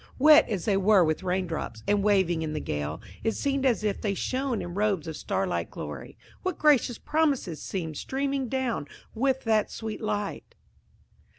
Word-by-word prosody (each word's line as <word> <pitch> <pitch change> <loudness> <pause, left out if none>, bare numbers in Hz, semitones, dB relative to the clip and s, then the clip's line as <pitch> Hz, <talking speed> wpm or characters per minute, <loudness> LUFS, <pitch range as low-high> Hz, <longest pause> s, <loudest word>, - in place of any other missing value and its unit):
Wet 300 +1 +7
as 195 -6 -2
they 200 -3 +2
were 195 -1 +5
with 155 +2 0
rain 185 0 0
drops, 155 -9 -5
and 205 0 +3
waving 190 -5 +3
in 155 -1 -3
the 155 - -2
gale, 75 +2 -3 0.2
it 225 - +1
seemed 275 -1 0
as 235 -4 +1
if 210 -2 -1
they 200 -2 -1
shone 255 +2 -1
in 175 - -5
robes 200 -4 0
of 160 - -5
starlight 190 +1 -2
glory. - - -8 0.2
What 370 -3 -2
gracious 280 -5 +3
promises 285 - 0
seemed 160 -6 -4
streaming 270 -1 -2
down 255 - -1 0.3
with 265 +3 0
that 220 -2 +2
sweet 220 -1 -6
light! 210 -2 -3
210 Hz, 175 wpm, -27 LUFS, 180-260 Hz, 0.3 s, Wet